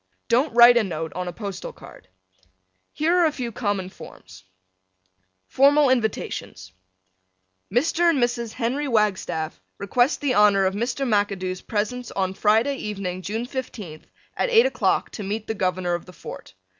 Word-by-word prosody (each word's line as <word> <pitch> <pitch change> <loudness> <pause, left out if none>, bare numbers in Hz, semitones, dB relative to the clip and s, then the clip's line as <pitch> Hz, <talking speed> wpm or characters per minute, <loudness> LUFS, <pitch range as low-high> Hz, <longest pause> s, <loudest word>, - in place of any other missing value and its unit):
Don't 260 +6 +2
write 240 0 +8
a 235 - +4
note 160 -4 -4
on 180 +1 -4
a - - -3
postal 200 0 -6
card. - - -15 0.8
Here 325 +4 +1
are 350 -2 +4
a - - 0
few 250 -5 -5
common 205 -5 -2
forms: 95 - -14 1.0
FORMAL 280 - +4
INVITATIONS 215 - -2 1.0
Mr. 325 - +2
and 330 - +2
Mrs. 240 -2 -1
Henry 265 +5 -2
Wagstaff 200 - -1 0.2
request 245 - +1
the 280 -3 +1
honor 205 -2 +4
of 190 - +1
Mr. 240 +6 -2
McAdoo's 200 -4 -1
presence 230 +3 -3
on 190 -1 -2
Friday 220 +8 +2
evening, 195 -5 -4
June 220 +5 -3
15th, 230 - -7 0.3
at - - 0
8 460 0 +6
o'clock - - 0
to - - -7
meet 210 +2 -4
the 220 - -3
Governor 185 -3 -1
of 175 +1 -4
the 180 - -12
Fort. 120 - -10
215 Hz, 155 wpm, -23 LUFS, 185-250 Hz, 1.0 s, write